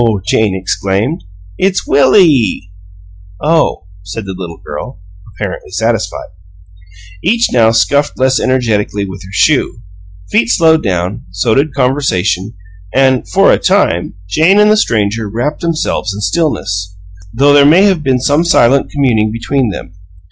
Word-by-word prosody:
Jane 105 0 +1
exclaimed. 95 - -2 0.4
"It's 190 0 0
WILLIE!" 135 - +3 0.7
"Oh," 160 - 0 0.2
said 95 +3 -7
the 95 - -6
little 85 -3 -8
girl, - - -7 0.3
apparently 100 -1 -6
satisfied. 110 -1 -2 0.9
Each 230 +4 +1
now 115 -3 +4
scuffed 140 +6 +1
less 130 0 +1
energetically 110 -6 -1
with 95 0 -9
her 95 - -12
shoe; 125 -1 +1 0.5
feet 115 - +2
slowed 160 +3 +3
down; 95 +3 -3
so 90 +5 -1
did 140 +2 0
conversation, 115 -8 -1 0.4
and, 130 -2 +2
for - - +4
a - - +1
time, 85 +1 0
Jane 165 - +3
and 210 0 +5
the - - +4
stranger 110 - -1
wrapped 120 +8 -3
themselves 155 -10 -2
in 105 - -7
stillness, 95 - -2 0.3
though 140 +6 +3
there 145 -1 +6
may 160 +7 +5
have 190 -5 +2
been 135 -3 0
some 145 +5 +1
silent 135 -5 +2
communing 115 -7 0
between 120 +2 -1
them. 95 - -7
115 Hz, 140 wpm, -12 LUFS, 100-145 Hz, 0.9 s, there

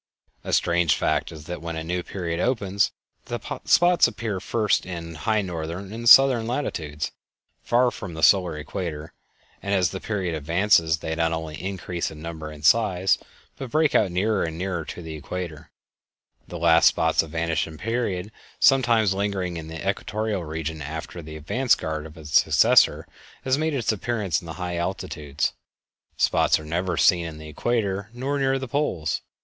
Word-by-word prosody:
A - - -5
strange 85 -2 +3
fact - - 0
is 80 -2 -10
that 90 +1 -6
when 85 0 -5
a 80 - -4
new 90 +2 -2
period 85 -2 -4
opens, 100 -4 +1 0.3
the - - -4 0.3
spots 175 -3 +5
appear 110 -4 -4
first 105 +2 +1
in 85 -2 -6
high 105 +6 0
northern 90 +3 -5
and 115 +1 +1
southern 130 -3 +7
latitudes, 80 - -3 0.5
far 120 +1 +2
from 95 -8 -8
the 80 - -5
solar 90 -3 +4
equator, 75 0 -5 0.5
and 100 0 0
as 90 -5 +2
the - - -5
period 95 -6 -2
advances 80 +1 +2
they 80 0 -4
not 80 0 0
only 80 -2 -5
increase 90 -2 -3
in 80 - -11
number 80 -1 -6
and 75 -1 -9
size, 95 0 +3 0.4
but 135 - -6
break 155 +2 +2
out 100 - +3
nearer 100 +4 +1
and 80 -1 -4
nearer 90 -2 -2
to 85 - -8
the 80 -1 -7
equator, 80 +1 -6 0.8
the 90 - -7
last 85 0 +5
spots - - +3
of 80 - -8
a 80 - -7
vanishing 80 -1 -1
period 105 -2 -2 0.3
sometimes 120 -7 +4
lingering 95 -3 -2
in 80 -1 -6
the 80 +3 -6
equatorial 105 0 -2
region 80 0 -5
after 80 +4 -6
the 80 0 -9
advance 120 - +2
guard 80 0 -4
of 80 +1 -15
its 75 -2 +3
successor - - +4 0.4
has 130 0 +2
made 155 +1 -1
its 120 -5 +1
appearance 105 -5 -1
in 85 - -12
the 80 - -5
high 90 -1 -2
latitudes. 75 -5 -3 0.6
Spots - - +3
are 80 - -10
never 90 +4 -2
seen 85 -4 +4
on 80 -1 -8
the 80 0 -9
equator 100 +3 -1
nor 135 +4 -2
near 135 0 +2
the 130 0 -5
poles. 115 - -1
90 Hz, 175 wpm, -24 LUFS, 80-110 Hz, 0.8 s, southern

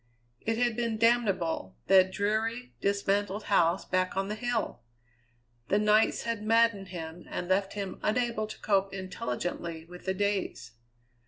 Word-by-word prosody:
It 225 0 -1
had 240 -1 +1
been 230 -2 -1
damnable 200 - +1
that 190 -1 +6
dreary, 220 +5 -1
dismantled 200 +1 0
house 175 -2 +2
back 185 +1 0
on 195 +1 0
the - - -1
hill! 230 - -2 0.9
The 200 - +3
nights 210 +1 +3
had 230 -2 -2
maddened 225 -2 +3
him 170 -1 -7
and 175 - -4
left 195 +1 +1
him 200 -2 -5
unable 230 -1 0
to - - -9
cope 195 -1 +1
intelligently 170 -2 -4
with 180 +1 -12
the 190 0 0
days. 200 - -1
200 Hz, 145 wpm, -29 LUFS, 185-220 Hz, 0.9 s, that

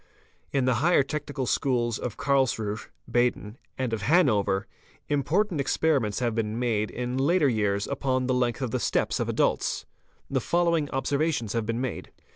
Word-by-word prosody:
— - - -38
In 135 -2 +1
the 130 - +3
higher 170 -2 +4
technical 145 -1 -4
schools 120 -3 0
of 120 -4 -5
Karlsruhe 120 -6 0 0.2
(Baden) 120 -2 0 0.2
and 130 -3 -2
of 110 - -2
Han 155 - +4
over, 100 -2 +1 0.4
important 155 +4 +1
experiments 135 -6 +1
have 120 -2 0
been 110 -1 -2
made 115 -4 0
in 125 +1 -3
later 155 +3 +3
years 105 -4 +1
upon 130 -2 -1
the 130 - +1
length 125 0 0
of 125 - -2
the - - 0
steps - - 0
of - - -1
adults. - - 0 0.4
The - - -1
following 170 -4 +1
observations 140 -4 -1
have 115 -2 -1
been 115 +1 -1
made. 130 - -4
130 Hz, 170 wpm, -27 LUFS, 115-140 Hz, 0.4 s, higher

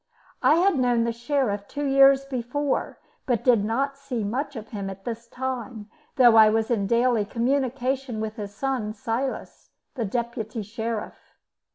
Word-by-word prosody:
I 305 - +5
had 350 -3 +3
known 245 -2 +2
the 235 - 0
Sheriff 235 -5 -1
two 290 0 -4
years 275 0 +5
before, 270 +2 -2 0.3
but 245 -5 0
did 235 -5 +4
not 275 +6 -1
see 260 -5 -4
much 270 +7 -3
of 220 -1 -8
him 200 -3 -5
at 195 0 -10
this 235 -1 -5
time, 240 -4 -5 0.2
though 245 -4 +6
I 220 -1 +8
was 225 +2 0
in 200 -4 +1
daily 235 0 +2
communication 255 +1 -1
with 220 +1 -4
his 205 -2 -5
son, 245 -4 -2
Silas, 250 +3 -4 0.2
the 245 - -3
Deputy 230 0 -3
Sheriff. 220 +1 -6
235 Hz, 160 wpm, -25 LUFS, 220-270 Hz, 0.3 s, I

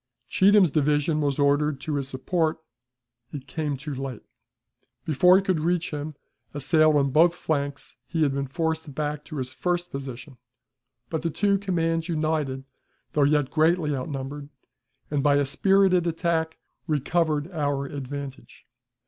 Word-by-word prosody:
Cheatham's 195 -3 +5
division 150 +1 +1
was 140 -2 0
ordered 145 0 +2
to 155 - -3
his 140 -2 -1
support; 155 +5 -1 0.7
it 140 -3 -7
came 145 0 -3
too 150 +2 -6
late. 135 -3 -6 0.8
Before 180 +5 +5
it 195 - -1
could 185 -4 +1
reach 170 +2 0
him, 150 0 -5 0.4
assailed 155 +2 +3
on 140 -2 +2
both 170 +5 +4
flanks, 145 -6 -3
he 165 -2 0
had 140 -2 +1
been 140 0 -2
forced 160 0 -2
back 150 0 -3
to 155 - -8
his 130 -1 -4
first 175 +2 -2
position, 135 0 -7 0.7
but 160 -2 -1
the 165 - -1
two 200 +4 +1
commands 165 -3 -1
united, 155 -4 -1 0.5
though 150 - +1
yet 145 -1 +2
greatly 160 -1 +2
outnumbered, 140 +1 -5 0.6
and, 145 -2 +1
by 145 0 +4
a 145 0 +2
spirited 185 +4 +3
attack, 165 -1 -1 0.3
recovered 155 +1 0
our 145 -4 -1
advantage. 140 0 -7
150 Hz, 145 wpm, -25 LUFS, 140-165 Hz, 0.8 s, Cheatham's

